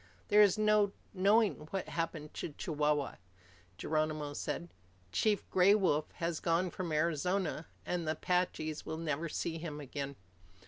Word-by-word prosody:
"There 210 +1 +7
is 205 -1 +5
no 210 -1 +3 0.2
knowing 195 -4 +3
what 195 - -3
happened 165 -2 -3
to 155 - -5
Chihuahua," 150 -5 0 0.6
Geronimo 155 -1 -1
said. 170 +3 -4 0.4
"Chief 210 - +1
Gray 190 +2 +6
Wolf 155 -7 +1
has 170 -1 -2
gone 170 +1 +1
from 180 -3 -4
Arizona, 165 +2 0 0.2
and 175 -2 -2
the 155 - +2
Apaches 160 -2 -1
will 160 - -4
never 160 0 -2
see 165 +1 -2
him 155 -3 -5
again." 140 0 -5
165 Hz, 140 wpm, -33 LUFS, 150-185 Hz, 0.6 s, There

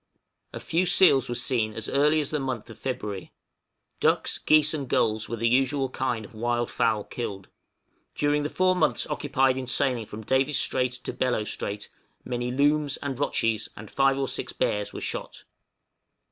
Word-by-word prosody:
A - - -6
few 175 +3 0
seals 170 -9 +6
were 120 - -2
seen 115 -3 0
as 110 - -4
early 150 +2 +3
as 145 - -3
the 150 - 0
month 130 -4 -4
of 110 - -13
February. 105 -7 -4 0.7
Ducks, - - +1
geese, 155 0 +4
and 140 -5 -4
gulls 110 -1 +1
were 115 - -2
the 115 +1 0
usual 135 +2 +2
kind 120 -5 -2
of 110 - -15
wild 120 +1 -1
fowl 110 -2 +1
killed. 100 -6 -6 0.7
During 145 0 +1
the 145 - -2
4 185 +2 +2
months 160 -4 +1
occupied 135 -3 +1
in 130 -1 -4
sailing 125 -3 +1
from 110 +1 -8
Davis 130 +5 +2
Strait 125 -1 +1
to 125 - -5
Bellot 125 -4 0
Strait, 100 0 -4 0.4
many 120 0 -2
looms 145 +1 +2
and 135 -2 -4
rotchies, 115 -6 0
and 105 0 -10
5 135 0 +3
or 135 -1 -1
6 - - -4
bears 105 0 -1
were - - -7
shot. - - -5
130 Hz, 175 wpm, -26 LUFS, 115-145 Hz, 0.7 s, seals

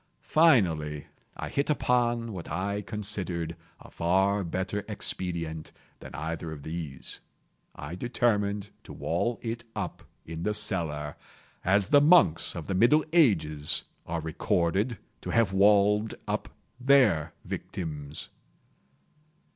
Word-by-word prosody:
Finally 80 - +4 0.3
I - - -4
hit 140 +2 -1
upon 120 -5 +1
what 90 -3 -7
I 100 +2 -2
considered 95 -6 -3 0.2
a - - -14
far 95 +4 +2
better 95 +4 -2
expedient 85 -6 -4 0.3
than - - -10
either 80 +1 -4
of 75 -3 -8
these. 80 -4 -6 0.6
I 70 +4 -7
determined 105 -2 0
to - - -9
wall 120 0 -1
it 115 0 -4
up 100 -5 -4 0.2
in 80 0 -6
the 105 +4 0
cellar—as 85 +1 -2
the 145 - +7
monks 145 - +5
of 85 -3 -5
the 95 - -2
middle 120 +11 +4
ages 80 - +3 0.2
are 85 0 -2
recorded 95 +7 0 0.2
to - - -6
have 115 -5 +2
walled 105 +2 +4
up - - -2 0.3
their 125 - +4
victims. 75 -4 -5
95 Hz, 115 wpm, -28 LUFS, 80-110 Hz, 0.6 s, the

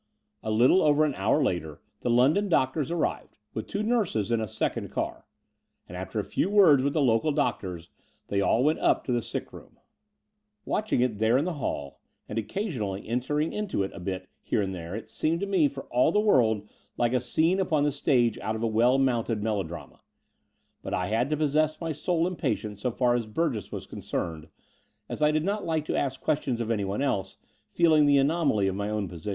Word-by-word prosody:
A - - -4
little 120 +12 +5
over 150 0 +4
an 150 - -1
hour 110 +9 +1
later 80 - -2 0.2
the - - -2
London 140 +13 +3
doctors 140 -2 +1
arrived, 170 -1 -2 0.2
with 110 - -5
two 205 +2 -2
nurses 205 - 0
in 115 -1 +2
a 110 - -2
second - - -2
car; - - -4 0.6
and, 90 - -9
after 95 +4 -4
a - - -1
few 180 - -1
words 185 -10 +6
with 140 +1 0
the 155 - +2
local 120 +4 +2
doctors, 90 - -2 0.3
they 100 0 0
all 115 +4 +2
went 155 +3 +2
up - - +2
to - - -3
the 120 -1 +1
sick - - -6
room. - - -13 0.9
Watching 215 - 0
it 120 -5 0
there 110 +3 +3
in 145 - +1
the 180 - -2
hall, 70 - -4 0.3
and 105 - -2
occasionally 110 - -4
entering 140 +7 -1
into 210 - -1
a 95 +1 -6
bit 95 0 -4
here 105 - 0
and 95 -1 -3
tljiere, 85 +2 -6
it 110 - -8
seemed 165 +2 -1
to - - 0
me 190 -7 +3
for 135 -1 -7
all 125 +6 +3
the 210 - +2
world 110 - +3 0.3
like 120 0 +1
a 125 - +2
scene 165 +9 +1
upon 155 -6 +1
the 145 - +2
stage 125 -5 +1
out 110 - -2
of 110 - -4
a - - +2
well 120 +4 +3
mounted 120 -5 0
melodrama: 100 -6 -4 0.8
but - - -3
I 90 +1 -2
had 115 +5 +1
to 150 - 0
possess 155 +1 +1
my 165 -1 -3
soul 165 +3 0
in 180 -1 -3
patience 105 - -3
so 125 - 0
far 120 +1 +1
as 120 -2 -1
Burgess 115 - -2
was - - -6
concerned, 80 -3 -5 0.6
as - - -6
I 150 - +5
did 155 +1 0
not 205 +1 -1
like 160 -2 -1
to - - -2
ask 135 -2 -1
questions 140 -5 -1
of 115 -1 -2
anyone 100 +3 -1
else, 100 -9 -2 0.3
feeling 155 -3 +4
the 140 -1 +5
anomaly 140 - +2
of 95 - 0
my 100 +2 -3
own 105 -2 -2
position. 90 +2 -7
125 Hz, 210 wpm, -27 LUFS, 105-155 Hz, 0.9 s, words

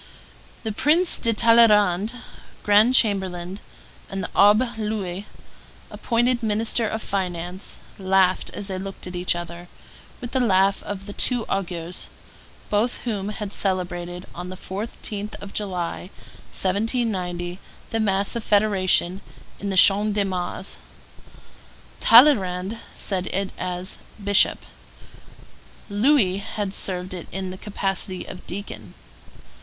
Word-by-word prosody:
The 220 - -2
Prince 320 - +3
de 230 - +2
Talleyrand, 215 -3 +4 0.5
grand 210 +5 +5
chamberlain, 190 -4 +1 0.5
and 195 -1 -4
the - - -4
Abbé 215 +5 +4
Louis, 205 -3 -3 0.6
appointed 240 +1 +1
minister 220 +1 +2
of 220 - -4
finance, 180 -1 -3 0.2
laughed 190 -1 +2
as 205 - -6
they 190 -1 -4
looked 195 0 -7
at 180 0 -7
each 180 0 +1
other, 175 0 -7 0.5
with 245 - -7
the 260 - +1
laugh 195 -4 +3
of 195 -1 -6
the 205 - -8
two 245 0 0
augurs; 175 -2 -3 0.6
both 215 +4 +1
of - - -15
them 205 -4 -2
had 210 -1 -5
celebrated, 180 -2 -2
on 180 +1 -7
the 185 - -6
14th 205 +2 -5
of 200 - -10
July, 180 -3 -3 0.4
1790, 185 -4 -1 0.3
the 225 - 0
mass 200 -1 +1
of 235 - -3
federation 195 -3 +2 0.4
in 200 - -3
the 190 - -1
Champ 205 +2 +6
de 205 -1 +1
Mars; 185 -2 -4 1.2
Talleyrand 205 -7 +5
had 230 - -10
said 185 -2 -2
it 195 0 -2
as 180 +1 -3 0.2
bishop, 200 0 +3 1.3
Louis 205 -3 +3
had 200 -1 -4
served 185 -1 -2
it 175 -3 -7
in 190 0 -4
the - - -7
capacity 195 -2 -3
of 180 - -10
deacon. 110 - -8
195 Hz, 130 wpm, -23 LUFS, 185-215 Hz, 1.3 s, Champ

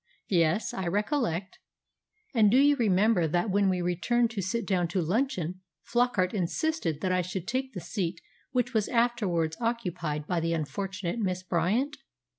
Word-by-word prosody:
"Yes, 170 +2 +2
I 190 -2 -3
recollect." 205 - -1 0.7
"And 220 -4 +5
do 240 - +4
you 285 +1 +6
remember 205 -6 +3
that 175 +5 0
when 200 0 +3
we 180 -1 0
returned 225 +7 +1
to 210 -3 -3
sit 225 +6 -2
down 180 -3 +1
to 170 +3 -1
luncheon 185 - -1 0.2
Flockart 240 -6 +1
insisted 185 - -1
that 185 - 0
I 185 0 +2
should 180 +1 -5
take 260 +2 -2
the 180 - -5
seat 175 0 -3 0.3
which 245 -1 0
was 215 -2 +1
afterwards 210 -10 +1
occupied 180 -11 -2
by 175 +2 0
the 165 +1 0
unfortunate 185 - -3
Miss 185 -3 -1
Bryant? 205 - 0
190 Hz, 160 wpm, -28 LUFS, 175-235 Hz, 0.7 s, you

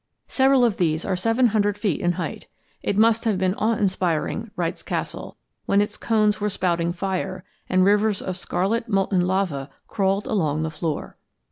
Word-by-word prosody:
Several 265 -1 +4
of 225 -4 0
these 160 -2 0
are 190 - 0
seven 225 +6 +2
hundred 205 -1 +1
feet 205 -1 -1
in 175 -1 +2
height. - - -5 0.3
"It 200 - -1
must 225 +1 +4
have 215 -4 +2
been 185 0 +1
awe 220 +2 +1
inspiring," 190 +1 -1
writes 170 -2 -2
Castle, - - -5 0.3
"when 200 - +3
its 205 +1 0
cones 215 -2 +1
were 210 - +1
spouting 170 -3 0
fire, 185 0 -3 0.3
and 185 0 +4
rivers 205 0 +3
of 185 - -4
scarlet 215 +6 -1
molten 195 -2 +2
lava 180 -8 -1 0.2
crawled 195 0 0
along 155 -7 0
the 160 - -2
floor." 155 -1 -4
195 Hz, 170 wpm, -23 LUFS, 180-215 Hz, 0.3 s, Several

